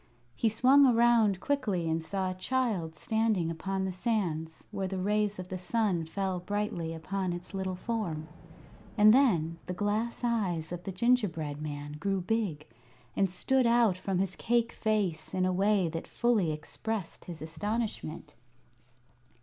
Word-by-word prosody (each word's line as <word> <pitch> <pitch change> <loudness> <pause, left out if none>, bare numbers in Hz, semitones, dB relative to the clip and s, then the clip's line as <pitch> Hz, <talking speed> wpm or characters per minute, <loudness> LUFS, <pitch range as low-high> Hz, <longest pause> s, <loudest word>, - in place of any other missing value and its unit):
He 225 - +2
swung 265 +5 +6
around 230 -5 +4
quickly 210 - 0
and 160 0 0
saw 185 +3 -2
a - - -3
child 185 -5 -1
standing 215 -3 0
upon 190 +3 -2
the 190 - -2
sands, 175 -6 -2
where 195 -2 -2
the 190 0 -4
rays 210 +2 +1
of 185 0 -7
the 185 - -4
sun 185 -3 0
fell 190 +2 -2
brightly 180 -3 -2
upon 180 +3 -3
its 175 +3 -7
little 190 -1 -2
form. 180 -7 -3 0.7
And 215 0 +8
then 170 - +3
the 180 - -3
glass 215 +4 -1
eyes 190 -10 0
of 175 0 -6
the 195 - -3
gingerbread 180 -9 +1
man 145 -1 -5
grew 195 +3 0
big, 180 -6 -1 0.5
and 195 - +2
stood 255 +7 +2
out 235 -5 +4
from 185 +1 -2
his 185 0 -1
cake 235 0 +1
face 185 -8 -1
in 185 0 +2
a 185 - +1
way 195 -1 +3
that 165 +1 -5
fully 225 -9 +1
expressed 175 +5 -5
his 170 -3 -7
astonishment. 165 -2 -4
190 Hz, 155 wpm, -30 LUFS, 165-220 Hz, 0.7 s, And